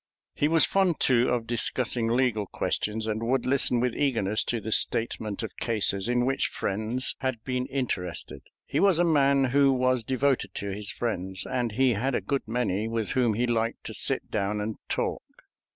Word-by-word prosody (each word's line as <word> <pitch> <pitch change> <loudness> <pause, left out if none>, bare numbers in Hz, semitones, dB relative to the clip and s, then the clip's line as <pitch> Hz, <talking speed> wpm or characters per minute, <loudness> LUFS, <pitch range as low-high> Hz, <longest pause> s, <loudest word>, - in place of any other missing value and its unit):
He 145 - +1
was 160 0 +5
fond, 190 -4 +1
too, 125 -1 +3
of 120 -2 0
discussing 120 0 0
legal 115 -4 +1
questions, 110 +3 -2
and 110 0 -2
would 125 +2 0
listen 130 -2 +2
with 125 0 0
eagerness 115 -7 +1
to 120 - -1
the 110 +1 -6
statement 110 -2 -1
of 110 - -6
cases 105 -2 -1
in 120 0 +2
which 135 +1 +1
friends 110 +6 -2
had 130 -4 -3
been 125 -1 -2
interested. 90 - -3 0.2
He - - -1
was 195 -4 +4
a 175 - +4
man 140 -4 +3
who 140 -1 +5
was 130 -2 +1
devoted 130 -5 0
to 100 0 -4
his 100 +1 -6
friends, 95 -5 -3
and 120 -3 -2
he 130 +1 +3
had 125 +5 -1
a - - +2
good 140 -4 -2
many 110 -3 -1
with 115 -2 -1
whom 120 -5 +2
he 120 +3 +1
liked 115 -1 -1
to - - -6
sit - - 0
down 105 0 -1
and 105 +1 -3
talk. - - -1
120 Hz, 185 wpm, -27 LUFS, 110-130 Hz, 0.2 s, was